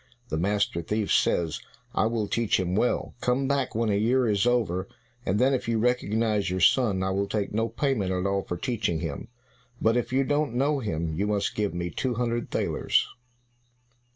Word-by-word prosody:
The - - -1
master 100 -2 0
thief 105 +4 -1
says, 85 -3 +1 0.3
"I 110 - +2
will 115 -2 -1
teach 115 -2 +1
him 90 -1 -1
well. 120 +5 0
Come 130 +2 +1
back 140 -4 0
when 115 -1 +1
a - - +2
year 125 +3 +2
is 105 +1 +2
over, 100 -7 +1 0.4
and 95 - +2
then 130 +4 +3
if 130 - -1
you 115 -1 +1
recognize 110 -3 +1
your 95 +1 -1
son, 95 +1 +3
I 95 - 0
will 100 +1 0
take 105 -1 -2
no 115 +2 0
payment 115 -5 0
at 90 0 -1
all 100 0 +1
for 90 - -5
teaching 95 -7 -1
him; 80 +4 -5 0.5
but 115 +1 +3
if 120 - -1
you 135 +1 +3
don't 145 -2 0
know 140 +3 +2
him, 85 -8 -2
you 100 +6 -1
must 100 -1 0
give 105 -4 -1
me 85 0 -3
two 125 -2 -2
hundred 120 0 -1
thalers." - - +1
105 Hz, 195 wpm, -26 LUFS, 95-120 Hz, 0.5 s, then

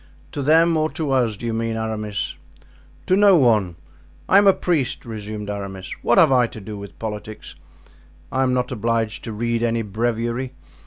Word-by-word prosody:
"To 145 - -4
them 165 +4 +4
or 155 0 +1
to 155 -4 -2
us, 120 -6 +1
do 120 - -7
you 115 - -1
mean, 115 0 -2
Aramis?" 110 -2 -3 0.7
"To 185 - +3
no 200 -1 +6
one. 110 - +3 0.5
I 195 - +6
am 200 - +4
a - - +9
priest," 150 -11 -1
resumed 105 -2 -6
Aramis. 100 -2 -5
"What - - +2
have - - +6
I 125 -2 +4
to 110 - -10
do 105 +1 -8
with 100 -1 -10
politics? 110 -2 -7 0.8
I 130 - 0
am 130 -1 +2
not 125 0 0
obliged 115 -1 -1
to 115 - -5
read 115 +2 -1
any 115 -1 0
breviary. 115 +4 -2
115 Hz, 180 wpm, -22 LUFS, 110-130 Hz, 0.8 s, a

